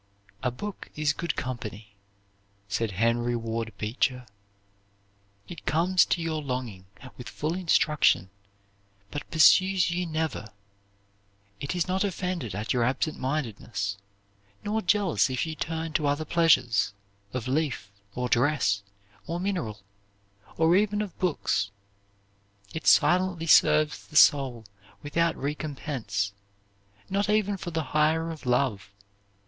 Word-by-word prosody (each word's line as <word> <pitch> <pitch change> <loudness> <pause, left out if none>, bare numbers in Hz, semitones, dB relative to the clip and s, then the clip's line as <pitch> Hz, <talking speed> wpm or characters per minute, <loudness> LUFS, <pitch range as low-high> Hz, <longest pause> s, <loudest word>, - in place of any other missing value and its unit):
"A 125 - +1
book 190 +12 -7
is 150 -1 +1
good 170 +1 -3
company," 110 -4 -6 0.7
said 100 +1 -2
Henry 120 +4 +1
Ward 115 -1 -3
Beecher. 125 +3 -1 1.2
"It 170 - -10
comes 180 +4 +3
to 170 - 0
your 160 -1 -2
longing 125 -9 -5 0.3
with 125 - -8
full 155 +2 -2
instruction, 155 - +2 0.8
but 145 - -6
pursues 185 +3 +5
you 175 0 -1
never. 155 -9 -2 1.1
It 140 - -3
is 175 0 0
not 190 +2 0
offended 180 - -3
at 105 +5 -2
your 125 -2 +2
absent 135 +5 -1
mindedness, 110 -7 -3 0.6
nor 215 +2 -1
jealous 195 -7 +2
if 130 +2 -1
you 160 - -4
turn 160 0 -4
to 150 -1 +1
other 145 +2 0
pleasures, 130 -11 +3 0.4
of 130 0 -4
leaf, 135 -7 -1 0.2
or 125 0 -1
dress, 120 -6 +2 0.5
or 170 +2 -3
mineral, 175 - -3 0.8
or 165 +2 +4
even 210 +1 +2
of 195 -5 -8
books. 145 - 0 1.0
It 160 - -5
silently 175 +2 +4
serves 155 -1 +4
the 155 - -15
soul 135 -6 +5 0.4
without 165 +3 +1
recompense, 135 -8 -3 0.7
not 200 +2 0
even 210 -1 +2
for 180 - -6
the 160 -1 -2
hire 160 +2 +2
of 155 -5 -9
love. 120 -6 +1
150 Hz, 125 wpm, -27 LUFS, 120-170 Hz, 1.2 s, pursues